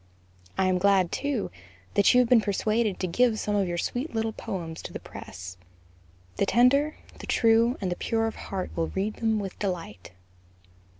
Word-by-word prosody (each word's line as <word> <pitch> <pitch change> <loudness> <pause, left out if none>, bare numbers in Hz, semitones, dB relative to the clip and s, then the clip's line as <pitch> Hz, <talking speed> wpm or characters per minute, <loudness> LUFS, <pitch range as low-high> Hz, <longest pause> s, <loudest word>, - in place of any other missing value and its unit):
I 190 - +3
am 185 -1 +2
glad, 195 -2 +3
too, 280 -6 -2 0.4
that 200 - +5
you 250 - +6
have 245 - +1
been 240 -2 +6
persuaded 215 0 0
to - - -1
give 225 +6 +2
some 210 -1 -1
of 200 -2 +2
your 175 0 -2
sweet 245 - -3
little 225 0 0
poems 165 -6 -5
to - - -8
the - - -5
press; 90 -1 -9 0.8
the - - +2
tender, 275 +7 +4 0.2
the - - -9
true, 230 +2 +3
and 185 -3 -2
the - - 0
pure 225 +3 0
of 225 - -3
heart 190 -2 -5
will 165 -1 0
read 200 +3 -2
them 225 -1 +1
with 195 -3 -5
delight. 170 - -4
205 Hz, 185 wpm, -27 LUFS, 185-230 Hz, 0.8 s, you